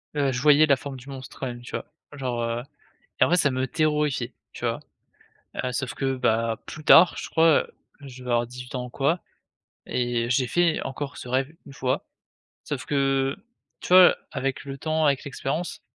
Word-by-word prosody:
Heu, 140 -2 +1
je 125 - -2
voyais 150 +1 +6
la 140 -2 +4
forme 140 -2 -7
du 130 +3 -12
monstre 130 -1 -9
quand 130 - -2
même, 120 0 -7
tu 120 - -11
vois? - - -4 0.3
Genre, 125 -4 -3
heu 115 +1 -2 0.6
et - - +8
en - - 0
fait 180 - +5
ça 140 -5 +3
me 130 +1 -1
terrorisait, 150 -5 0 0.2
tu - - -9
vois? - - -1 0.8
Heu, 125 - -1
sauf 125 -2 -3
que, 135 -1 -1
bah, 115 -2 0
plus 155 - -9
tard, 175 +3 +7
je - - -6
crois, 160 -1 +4 0.3
je 130 -2 -11
devais 125 -1 -4
avoir 120 0 +2
18 125 +1 -9
ans 125 0 -3
ou - - -9
quoi 145 +7 0 0.7
et 120 -1 -1
j'ai 125 -1 +2
fait 175 -2 +2
encore 140 +1 -5
ce 125 - -8
rêve 130 +4 0
une 140 - -12
fois. 130 -1 -2 0.6
Sauf 140 -4 -4
que, 135 -1 +1 0.5
tu - - -7
vois 185 0 +8 0.2
avec 135 -1 -2
le 135 0 -6
temps, 155 +1 0
avec 140 -1 +2
l'expérience, 145 +4 -4
135 Hz, 200 wpm, -25 LUFS, 125-150 Hz, 0.8 s, et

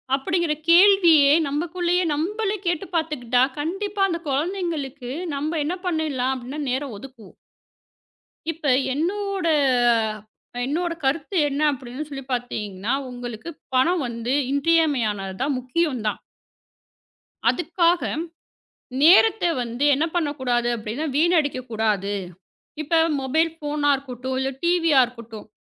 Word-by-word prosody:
அப்படிங்கிற 325 +4 0 0.2
கேள்வியே 340 -5 +6 0.2
நமக்குள்ளே 345 +4 -1 0.2
நம்மளே 410 +7 -1
கேட்டுப் 345 0 -2
பாத்துக்கிட்டா 255 -7 +1 0.2
கண்டிப்பா 390 +6 -3
அந்த 340 -3 -2
குழந்தைகளுக்கு 290 -4 -3 0.2
நம்ப 310 +3 -2
என்ன 350 +5 -2
பண்ணிடலாம் 300 -7 0
அப்டின்னா 260 +4 -7
நேரம் 265 -1 -3
ஒதுக்கு 240 -2 -12 1.2
இப்ப 325 -1 -11 0.3
என்னோட 385 +4 -2 1.2
என்னோட 335 +5 -1
கருத்து 290 +7 -1
என்ன 280 +1 -3
அப்படின்னு 255 +2 -7
சொல்லி 270 -2 -7
பாத்தீங்கன்னா, 210 -4 -3 0.2
உங்களுக்குப் 245 +5 -8 0.2
பணம் 325 +5 +3
வந்து 235 +1 -3 0.2
இன்றியமையானது 275 -10 +1
தான். 275 +1 0
முக்கியம் 255 +1 -1
தான். 210 - -2 1.3
அதுக்காக 345 0 +1 1.0
நேரத்த 395 +7 +6 0.2
வந்து 240 +3 -3
என்ன 290 +4 0
பண்ண 330 -4 +1
கூடாது 240 -2 +1
அப்படின்னா 230 +7 -4
வீணடிக்க 310 -4 +2
கூடாது. 210 -3 0 0.7
இப்ப 315 +2 +1 0.2
மொபைல் 315 +5 +1
ஃபோனா 295 -1 -1
இருக்கட்டும். 260 -1 -5
இல்லை 265 0 -1
டிவியா 335 -5 +4
இருக்கட்டும். 230 -3 -11
290 Hz, 110 wpm, -23 LUFS, 250-335 Hz, 1.3 s, கேள்வியே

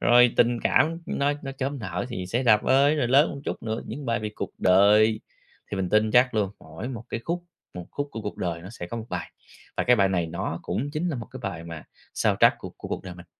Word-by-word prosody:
rồi 120 0 +6
tình 120 0 +3
cảm 165 +2 +2
nó 140 +1 +1
nó 135 - -5
chớm 135 +1 -3
nở 95 -1 -4
thì 95 -7 -5
"Xe 120 +8 -1
Đạp 110 -4 +5
Ơi", 140 +3 +4
rồi 125 -5 +1
lớn 140 +5 +5
một 140 - -7
chút - - -4
nữa, 110 0 -3
những 145 -1 -6
bài 115 -2 0
về 105 -1 -3
cuộc - - -4
đời, 105 +4 +5 0.5
thì 100 - -3
mình 95 -1 -1
tin 110 +3 +3
chắc 125 +2 +4
luôn, 105 -3 +1
mỗi 80 +9 -7
một 120 -3 -6
cái 115 - -3
khúc 175 +1 -2 0.3
một 90 -1 -7
khúc 145 0 -3
của 115 - -6
cuộc 105 - -5
đời 85 -2 -3
nó 95 - -9
sẽ 105 -6 -7
có 115 - -6
một 115 -1 -6
bài. - - -4 0.5
Và - - +1
cái 125 - +5
bài 100 -3 +4
này 90 -3 0
nó 85 +1 -4
cũng 140 +5 -2
chính 155 +4 -2
là 155 - -2
một 115 -3 -6
cái 130 - -9
bài 90 -6 -4
mà 85 -2 -8 0.3
soundtrack - - +4
của - - -8
của - - -8
cuộc - - -3
đời 90 -1 -7
mình. 85 0 -13
115 Hz, 260 wpm, -26 LUFS, 95-130 Hz, 0.5 s, rồi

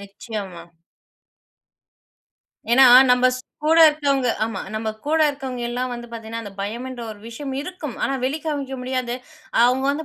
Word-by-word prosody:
நிச்சயமா. 200 -3 -7 2.1
ஏனா, 265 +2 +7 0.3
நம்ம 250 0 +5
ஸ் - - -7 0.2
கூட 320 +2 +4
இருக்கவங்க. 280 -4 0 0.2
ஆமா. 220 -4 -4
நம்ம 220 0 -2 0.2
கூட 315 +2 +2
இருக்கவங்கலாம் 250 -3 -4
வந்து 240 0 -7
பாத்தீங்கன்னா, 225 0 -6
அந்த 205 -3 -9
பயம்ன்ற 240 +5 -5
ஒரு 205 - -14
விஷயம் 270 +4 -6
இருக்கும். 300 -4 -6
ஆனா, 275 - 0
வெளிக்காமிக்க 285 -1 -3
முடியாது. 255 -1 -2 0.5
அவங்க 255 +2 +3
வந்து 300 +3 -3
255 Hz, 130 wpm, -22 LUFS, 230-280 Hz, 2.1 s, ஏனா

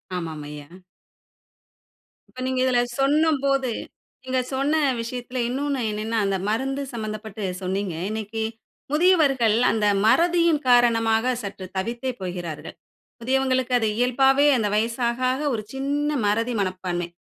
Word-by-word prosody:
ஆமாம் 160 -4 -5
ஐயா. 150 -1 -9 1.6
இப்ப - - -13
நீங்க 260 0 -1
இதில 255 -2 +3 0.2
சொல்லும்போது 275 -2 +2 0.5
நீங்க 260 0 -1
சொன்ன 285 +4 +1 0.2
விஷயத்தில 245 +2 -5
இன்னொன்னு 275 +1 -1
என்னன்னா, 215 +2 -2
அந்த 195 -1 0
மருந்து 270 +6 -1
சம்பந்தப்பட்டு 215 -2 -5 0.2
சொன்னீங்க. 190 -1 -2
இன்னக்கி 220 +1 -3 0.5
முதியவர்கள் 295 - +4 0.2
அந்த 215 -2 0 0.2
மறதியின் 335 +4 +4
காரணமாக 230 -1 +4
சற்று 195 -2 -7
தவித்தே 235 +6 -2
போகிறார்கள். 175 -4 -6 0.5
முதியவங்களுக்கு 260 0 +1
அது 220 - +1
இயல்பாவே 265 +3 +3
அந்த 220 -3 0
வயசு 230 +3 0
ஆக, 235 +1 -4
ஆக 260 +3 -2
ஒரு 215 -2 -3
சின்ன 290 +2 -1
மறதி 230 +4 0
மனப்பான்மை. 185 -2 -2
240 Hz, 120 wpm, -24 LUFS, 210-270 Hz, 1.6 s, முதியவர்கள்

